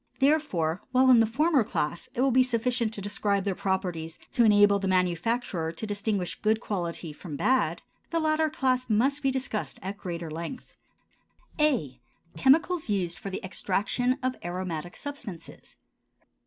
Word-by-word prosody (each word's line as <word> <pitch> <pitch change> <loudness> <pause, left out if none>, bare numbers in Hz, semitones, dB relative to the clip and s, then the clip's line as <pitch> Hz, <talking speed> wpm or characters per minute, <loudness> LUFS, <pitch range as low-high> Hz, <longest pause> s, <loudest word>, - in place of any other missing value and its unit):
Therefore, 240 - +1
while 260 0 +5
in 245 - +7
the 225 - +4
former 285 +3 +3
class 170 -4 -3
it 245 - 0
will 270 0 +3
be 255 +1 +5
sufficient 240 -2 0
to 200 - -5
describe 200 0 0
their 200 -1 0
properties 180 -4 -2
to 240 - +3
enable 205 -2 +6
the 195 - -2
manufacturer 180 -1 0
to 220 - -5
distinguish 205 -3 -2
good 220 0 +2
quality 175 -7 -4
from 155 -1 -8
bad, 255 - +1 0.3
the 335 - 0
latter 310 0 +2
class 255 -4 0
must 265 +7 +2
be 270 - +2
discussed 260 -5 -3
at 195 +2 -5
greater 170 -3 -5
length. 170 +11 -7 0.9
A. 215 - +1 0.3
Chemicals 315 +3 +3
used 180 -4 -1
for 195 - -5
the 190 - -5
Extraction 210 +7 0
of 255 0 0
Aromatic 175 -1 -4
Substances. 250 - -8
210 Hz, 155 wpm, -27 LUFS, 180-255 Hz, 0.9 s, in